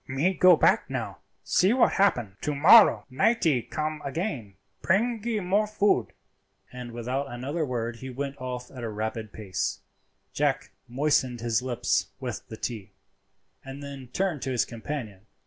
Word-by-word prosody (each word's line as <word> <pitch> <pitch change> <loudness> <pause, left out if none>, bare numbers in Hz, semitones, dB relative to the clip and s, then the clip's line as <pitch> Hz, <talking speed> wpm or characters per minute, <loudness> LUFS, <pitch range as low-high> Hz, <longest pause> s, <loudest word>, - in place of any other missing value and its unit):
"Me 140 +8 +1
go 185 0 +6
back - - +3
now, - - -4 0.2
see 190 +5 +3
what 255 - +4
happen. 120 - +1
To 150 - -2
mollow 190 +10 +7
nightee 160 - +2
come 155 +4 -4
again—bringee 185 - -2
more 200 +4 +1
food." 205 - +2 0.7
And 125 -1 -7
without 125 +4 -3
another 135 +7 -3
word 120 -4 -3
he 130 +2 -8
went 140 +1 -5
off 125 -1 -5
at 125 -3 -8
a 115 - -3
rapid 110 0 -4
pace. 100 -4 -3 0.5
Jack - - 0 0.2
moistened 130 -2 0
his 115 0 +1
lips 125 -2 0
with 125 -4 -6
the 110 - -8
tea, 110 -6 -5 0.7
and 135 +2 -9
then 140 -2 -8
turned 175 0 -2
to - - -3
his 125 - +1
companion. 115 -4 -7
130 Hz, 145 wpm, -27 LUFS, 120-165 Hz, 0.7 s, mollow